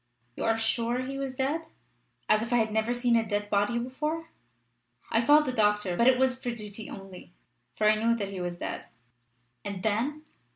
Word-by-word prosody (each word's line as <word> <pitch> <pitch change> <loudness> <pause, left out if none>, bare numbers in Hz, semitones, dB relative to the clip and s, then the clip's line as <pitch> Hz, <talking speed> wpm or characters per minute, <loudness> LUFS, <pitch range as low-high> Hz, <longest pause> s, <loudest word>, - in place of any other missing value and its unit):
"You - - -3
are 225 0 +2
sure 230 +2 0
he 275 +1 -5
was 270 -1 -3
dead?" 295 +5 -1 0.6
"As 215 - +4
if 230 - -4
I - - +3
had 220 -2 +2
never 220 +2 +1
seen 240 -1 +2
a 230 - +4
dead 205 -1 -3
body 205 +4 +2
before! 300 +7 -3 0.8
I 225 - +3
called 295 +4 +6
the 255 - -2
doctor, 210 -5 +2
but 235 +6 +3
it 260 -1 +6
was 260 0 +2
for 245 - -2
duty 215 -2 -6
only, 190 -2 -10 0.4
for 215 - +2
I 215 - +7
knew 230 0 +4
that 200 -4 -3
he 190 -2 -5
was 175 -1 -3
dead." - - -5 0.8
"And 200 -2 -5
then?" 250 +9 0
230 Hz, 200 wpm, -28 LUFS, 210-255 Hz, 0.8 s, I